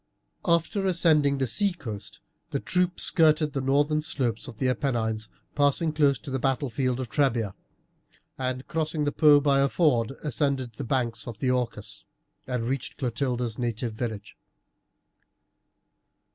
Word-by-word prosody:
After 170 +3 +1
ascending 155 -6 +3
the 135 - +1
sea 195 - +1
coast 110 -12 -8 0.3
the - - -2
troop 180 0 0
skirted 155 -2 +3
the 135 - -1
northern 145 +3 +2
slopes 130 -7 -2
of 120 -5 -9
the 130 - 0
Apennines, 115 -4 -1 0.2
passing 145 +2 +2
close 145 -3 +3
to 135 - -9
the 135 - -1
battlefield 130 -1 0
of 130 - -3
Trebia, 115 -8 +1 0.8
and 130 0 -3
crossing 155 -1 -1
the 145 - 0
Po 150 -1 +6
by 140 -1 +3
a 140 0 +3
ford, 130 -9 +2
ascended 135 -3 -1
the - - -6
banks 120 -2 -1
of 115 -3 -6
the 125 +3 0
Orcus, 125 -3 -3 0.4
and 125 -3 -2
reached 130 +1 -3
Clotilde's 125 -3 -2
native 120 -1 -2
village. 110 -3 -5
135 Hz, 145 wpm, -26 LUFS, 120-150 Hz, 0.8 s, Po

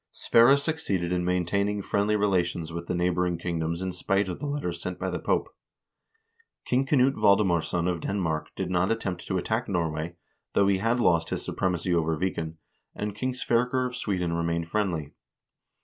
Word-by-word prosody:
Sverre 120 +4 +5
succeeded 140 - -1
in 90 -1 0
maintaining 100 +3 0
friendly 105 +2 +1
relations 90 -5 0
with 85 0 -5
the 90 - -1
neigh 90 +1 +2
boring 90 -1 0
kingdoms 85 0 -2
in 95 - -2
spite 100 +2 0
of 90 - -5
the 145 - -4
letters 90 -13 -3
sent 90 -1 -4
by - - -3
the - - -2
Pope. - - -1 1.1
King 130 +2 +1
Knut 135 -1 +4
Valdemarsson 90 -6 +2
of 85 -2 -1
Denmark 80 -6 -1
did 95 -1 -3
not 90 +1 +2
attempt 95 -6 -3
to 95 - 0
attack 110 +7 -1
Norway, 85 -2 -2 0.4
though 100 - +4
he 95 -1 +3
had 115 +4 +1
lost 85 -7 +3
his - - -3
supremacy 90 -1 -1
over 80 -2 +1
Viken, 80 -3 -2 0.4
and 105 0 -3
King 130 +4 -2
Sverker 125 +1 +1
of 125 0 -4
Sweden 90 -8 -1
remained 85 0 -1
friendly. 85 -9 -1
90 Hz, 175 wpm, -27 LUFS, 85-105 Hz, 1.1 s, Sverre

